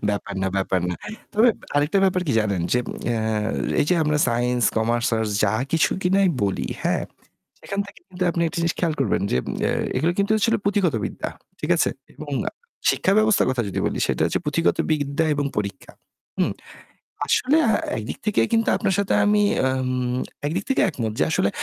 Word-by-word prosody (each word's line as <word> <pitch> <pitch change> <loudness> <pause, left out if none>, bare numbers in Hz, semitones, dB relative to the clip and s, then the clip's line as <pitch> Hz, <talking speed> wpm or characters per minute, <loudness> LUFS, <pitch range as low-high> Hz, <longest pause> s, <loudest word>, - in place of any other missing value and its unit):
ব্যাপার 100 0 -2
না, 95 - +1
ব্যাপার 95 -1 +1
না। 90 - -1 0.4
তবে 225 +4 +5 0.3
আরেকটা 150 +7 +2
ব্যাপার 185 -1 +2
কি 140 - +1
জানেন 100 -5 -1
যে, 125 - +4 0.3
অ্যা 120 -1 +1 0.6
এই - - +2
যে - - +5
আমরা 150 0 +1
সাইন্স, 120 +1 0
কমার্স, 115 +2 +1
আর্টস 110 -1 -1
যা 105 +1 +1 0.2
কিছু 165 - +3
কিনা 190 +2 +3 0.2
বলি, 100 - -1
হ্যাঁ, - - 0 0.6
সেখান 200 - -4
থেকে 200 - -14 0.3
আপনি 170 - -1
একটা 160 - -6
জিনিস 165 0 +1
খেয়াল 165 -3 +1
করবেন 135 - +1
যে - - +3 0.3
অ্যা.. - - +2 0.3
এগুলো 165 +3 +2
কিন্তু 200 +2 +2
আসলে 225 +2 +2
পুঁথিগত 200 - +2
বিদ্যা। - - -4 0.3
ঠিক - - -4
আছে - - +3 0.3
এবং 150 -1 -8 0.6
শিক্ষা 190 - +2
ব্যবস্থার 215 -1 +4
কথা 130 -2 0
যদি - - -3
বলি - - -1
সেটা - - -1
হচ্ছে - - 0
পুঁথিগত 165 +3 +1
বিদ্যা 145 +1 0
এবং 145 0 -1
পরীক্ষা। 100 -1 -4 0.5
হুম, - - +1 0.7
আসলে 275 - +3 0.4
একদিক 110 0 -5
থেকে 210 - +2
কিন্তু 225 0 +3
আপনার 190 - 0
সাথে 200 - 0
আমি 210 0 +4 0.2
আম 130 -1 -1 0.3
একদিক 180 +6 -2
থেকে 270 - +2
একমত 115 - -3
যে - - +4
আসলে - - +2
145 Hz, 180 wpm, -23 LUFS, 115-190 Hz, 0.7 s, তবে